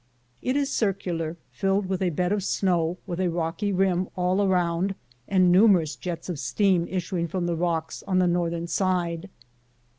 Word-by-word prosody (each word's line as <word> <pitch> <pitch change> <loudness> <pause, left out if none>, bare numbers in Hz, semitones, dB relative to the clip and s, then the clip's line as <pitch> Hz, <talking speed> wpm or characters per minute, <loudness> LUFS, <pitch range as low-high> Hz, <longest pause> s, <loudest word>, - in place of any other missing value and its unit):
It 255 - -1
is 280 -1 0
circular, 175 -6 -1
filled 195 0 0
with 185 0 -2
a 185 - +2
bed 180 +3 -1
of 205 -2 0
snow, 175 -3 +1
with 180 -3 -4
a 185 -1 +1
rocky 170 +5 -1
rim 185 -1 +1
all 180 +2 +1
around 185 0 +1 0.3
and 185 -2 +4
numerous 180 -5 +5
jets 175 -2 -5
of 175 -6 -4
steam 185 -3 +2
issuing 180 -2 -2
from 175 +2 -2
the 170 -1 0
rocks 165 -1 -2
on 185 -2 +1
the 185 - +4
northern 170 -1 0
side. 175 0 -1
180 Hz, 170 wpm, -25 LUFS, 170-195 Hz, 0.3 s, numerous